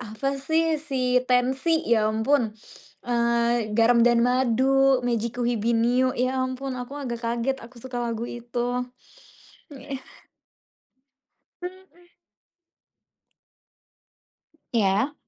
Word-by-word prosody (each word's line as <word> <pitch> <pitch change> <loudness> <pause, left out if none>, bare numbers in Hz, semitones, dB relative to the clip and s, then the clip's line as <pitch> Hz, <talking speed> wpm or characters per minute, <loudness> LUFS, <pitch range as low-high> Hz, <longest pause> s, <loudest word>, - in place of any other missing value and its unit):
apa 250 +4 -3
sih 320 +2 +1
si 260 -4 0
Tenxi 265 +6 +1
ya 220 -2 +3
ampun, 225 0 +1 0.5
eee, 235 -2 +1
"Garam& 235 +1 +5 0.2
Madu," 260 +2 +3
"Mejikuhibiniu," 235 +1 +1
ya 255 +1 0
ampun 260 0 -4
aku 250 +4 -7
agak 240 -4 -5
kaget 235 +3 -1
aku 245 +2 -15
suka 255 -1 -7
lagu 230 -1 -3
itu. 240 +1 -3 0.9
Heeh. 270 0 -7 1.6
Mhm. 360 -1 -10 2.7
Iya. 210 +5 +2
250 Hz, 85 wpm, -25 LUFS, 235-270 Hz, 2.7 s, Garam